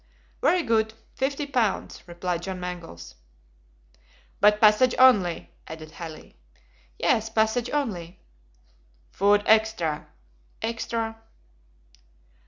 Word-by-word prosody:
"Very 360 -1 +3
good! 220 -2 +1 0.2
Fifty 275 +2 -2
pounds," 245 -8 -1
replied 175 0 -3
John 185 +1 -5
Mangles. 175 - -8 1.3
"But 210 +1 +5
passage 215 +4 +5
only," 205 -10 +4 0.2
added 155 -1 -9
Halley. 160 -2 -10 0.6
"Yes, 220 0 +1
passage 220 +2 +1
only." 185 - -3 0.9
"Food 205 +1 +3
extra." 220 -9 +2 0.5
"Extra." 225 0 -3
215 Hz, 85 wpm, -25 LUFS, 175-230 Hz, 1.3 s, But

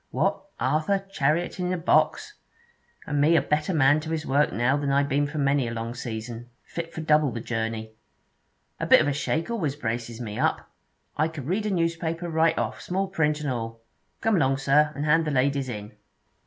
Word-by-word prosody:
'What! - - 0
Arthur! 155 +10 +1 0.2
chariotin' 175 +5 0
a 185 - 0
box! 420 - +2 0.7
And 145 -2 0
me 160 +3 +5
a - - +5
better 150 +4 0
man 145 -2 +4
to 155 +1 -7
his 160 -1 -2
work 145 +2 +2
now 120 +6 +2
than 145 -1 -1
I 140 +1 +3
been 140 +1 +1
for 150 +2 -6
many 140 -3 +2
a - - -3
long 115 +1 -4
season, 120 0 -6
fit 165 -1 -6
for 160 - -6
double 155 -2 +3
the 115 - -4
journey! 110 -1 -3 0.9
A - - -2
bit - - +8
of - - 0
a 145 - +1
shake 160 +7 -1
always 160 -12 -1
braces 120 -3 -4
me 110 -4 -5
up. - - 0 0.5
I 155 - +3
could 160 -5 -7
read 200 +7 -1
a - - 0
newspaper 165 -1 -1
right 160 +1 +2
off, - - -2
small 190 +1 -2
print 150 -5 0
and 145 -3 -1
all. 115 -2 -5 0.4
Come 225 -3 +2
along, 135 -4 +2
sir, 145 +2 +3
and 145 - -3
hand 160 +2 +4
the - - -1
ladies 140 -1 +1
in.' 105 -3 -6
145 Hz, 200 wpm, -26 LUFS, 125-165 Hz, 0.9 s, bit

